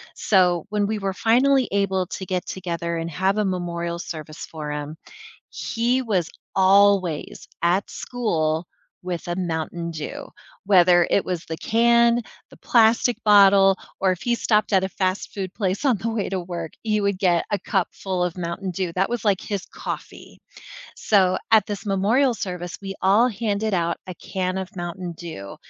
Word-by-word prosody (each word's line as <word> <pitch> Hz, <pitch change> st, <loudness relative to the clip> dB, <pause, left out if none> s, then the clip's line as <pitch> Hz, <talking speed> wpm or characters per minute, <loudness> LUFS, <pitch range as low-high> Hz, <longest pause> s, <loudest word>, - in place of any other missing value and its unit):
so 180 Hz, -4 st, +2 dB
when 205 Hz, -1 st, 0 dB
we 215 Hz, +1 st, -1 dB
were 195 Hz, -1 st, -2 dB
finally 255 Hz, +5 st, +3 dB
able 190 Hz, -2 st, 0 dB
to 190 Hz, -, -6 dB
get 185 Hz, 0 st, -2 dB
together 170 Hz, -2 st, -3 dB
and 165 Hz, 0 st, -4 dB
have 190 Hz, +5 st, 0 dB
a 210 Hz, -, +1 dB
memorial 170 Hz, -2 st, -3 dB
service 155 Hz, -2 st, -7 dB
for 150 Hz, -2 st, -6 dB
him 150 Hz, +1 st, -5 dB, 0.5 s
he 240 Hz, +3 st, -1 dB
was 190 Hz, -8 st, 0 dB, 0.3 s
always 195 Hz, -4 st, +3 dB, 0.2 s
at 180 Hz, +4 st, +2 dB
school 165 Hz, -9 st, -2 dB, 0.3 s
with 180 Hz, -2 st, -5 dB
a 175 Hz, -, -1 dB
Mountain 170 Hz, -1 st, -3 dB
Dew. 155 Hz, -2 st, -6 dB, 0.4 s
Whether 180 Hz, -3 st, +5 dB
it 200 Hz, -, +2 dB
was 180 Hz, -3 st, -3 dB
the 160 Hz, -, -5 dB
can, 235 Hz, +2 st, +3 dB, 0.3 s
the -, -, -16 dB
plastic 235 Hz, +1 st, +3 dB
bottle, 195 Hz, -2 st, +6 dB, 0.3 s
or 190 Hz, -1 st, +3 dB
if 180 Hz, -, -4 dB
he 240 Hz, -1 st, +1 dB
stopped 215 Hz, -2 st, +1 dB
at 190 Hz, -1 st, +4 dB
a 190 Hz, -, -1 dB
fast 185 Hz, 0 st, -2 dB
food 190 Hz, -3 st, -4 dB
place 195 Hz, 0 st, -1 dB
on 255 Hz, -6 st, +3 dB
the 220 Hz, +4 st, -3 dB
way 220 Hz, -3 st, -2 dB
to 190 Hz, -, -2 dB
work, 170 Hz, -2 st, -6 dB
he 215 Hz, -2 st, +1 dB
would 200 Hz, -1 st, 0 dB
get 180 Hz, -3 st, +2 dB
a 205 Hz, -, +2 dB
cup 190 Hz, 0 st, 0 dB
full 185 Hz, -2 st, -3 dB
of 180 Hz, 0 st, -3 dB
Mountain 180 Hz, +2 st, -4 dB
Dew, 180 Hz, -1 st, -3 dB
that 190 Hz, +1 st, +1 dB
was 240 Hz, -1 st, -3 dB
like 200 Hz, -3 st, +2 dB
his 200 Hz, -3 st, -4 dB
coffee. -, -, -8 dB, 0.6 s
So 190 Hz, -3 st, +3 dB, 0.2 s
at 220 Hz, -3 st, +6 dB
this 205 Hz, 0 st, -5 dB
memorial 220 Hz, +7 st, +2 dB
service, 180 Hz, -4 st, -5 dB
we 195 Hz, 0 st, -5 dB
all 205 Hz, +6 st, +5 dB
handed 215 Hz, -1 st, -1 dB
out 170 Hz, -1 st, 0 dB
a 185 Hz, -, -5 dB
can 185 Hz, +1 st, -3 dB
of 190 Hz, -1 st, -6 dB
Mountain 175 Hz, 0 st, -5 dB
Dew, 160 Hz, -, -8 dB
190 Hz, 175 wpm, -23 LUFS, 175-210 Hz, 0.6 s, bottle